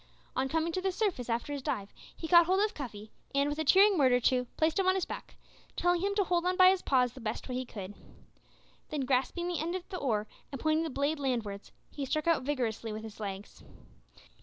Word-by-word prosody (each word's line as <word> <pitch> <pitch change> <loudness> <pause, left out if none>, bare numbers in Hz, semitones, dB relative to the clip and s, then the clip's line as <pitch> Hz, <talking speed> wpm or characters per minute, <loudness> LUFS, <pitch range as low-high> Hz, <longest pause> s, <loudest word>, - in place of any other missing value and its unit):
On 265 +1 0
coming 325 +3 0
to 370 - -1
the 380 0 0
surface 360 - -1
after 235 +5 -1
his 285 - -4
dive 205 -8 -3 0.2
he 325 - -5
caught 345 0 +7
hold 375 +1 +3
of 430 - -4
Cuffy, 215 -6 -8 0.2
and, 280 +1 +3
with 295 +1 -3
a - - +1
cheering 390 +4 +5
word 260 -3 +5
or 245 - +4
two, 250 0 +1
placed 315 +4 +2
him 380 - +2
on 375 - +4
his 380 - 0
back, - - -8 0.4
telling 355 -1 +2
him 400 +1 0
to 405 - +3
hold 350 -2 +1
on 365 +1 0
by 370 0 +8
his 380 -1 0
paws 250 -3 +2
the 260 - -11
best 220 0 -4
way 255 - -4
he 255 +1 -2
could. 200 -3 -7 1.0
Then 300 -2 -2
grasping 270 +7 0
the 350 -3 -2
end 335 +3 -2
of 365 -1 -5
the 370 - -4
oar, 215 -6 0 0.3
and 275 - -5
pointing 315 +2 +2
the - - -3
blade 285 +3 -1
land 255 -5 0
wards, 200 0 -8 0.2
he 285 - -5
struck 305 +2 -1
out 335 -4 +3
vigorously 240 -5 -2
with 215 +1 -6
his 220 -1 -10
legs. 200 -1 -7
285 Hz, 240 wpm, -31 LUFS, 245-350 Hz, 1.0 s, by